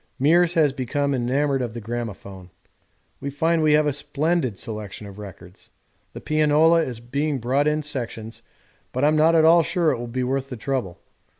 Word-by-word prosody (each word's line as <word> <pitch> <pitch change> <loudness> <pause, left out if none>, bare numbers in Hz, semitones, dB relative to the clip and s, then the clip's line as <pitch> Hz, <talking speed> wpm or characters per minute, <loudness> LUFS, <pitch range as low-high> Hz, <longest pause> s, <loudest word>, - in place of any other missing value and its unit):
Meares 170 +5 +3
has 150 -4 +3
become 140 +2 -1
enamoured 135 +2 0
of 120 -2 -4
the - - -4
gramophone. 105 -5 -7 0.7
We 140 - -4
find 160 +4 +1
we 155 -1 +3
have 150 0 +4
a 145 - +1
splendid 145 - -1
selection 105 -1 -7
of 100 0 -11
records. 95 -3 -12 0.4
The - - -7
pianola 155 +2 +3
is 125 -7 -4
being 140 +5 -2
brought 130 +4 0
in 150 0 0
sections, 120 -5 -5 0.5
but 130 - -1
I'm 150 +1 +4
not 160 +2 +4
at 160 -1 +5
all 170 +1 +7
sure 165 0 +1
it 125 - -3
will 120 - -5
be 125 +2 -3
worth 135 +1 -2
the 125 - -6
trouble. 110 -7 -3
135 Hz, 185 wpm, -23 LUFS, 120-155 Hz, 0.7 s, all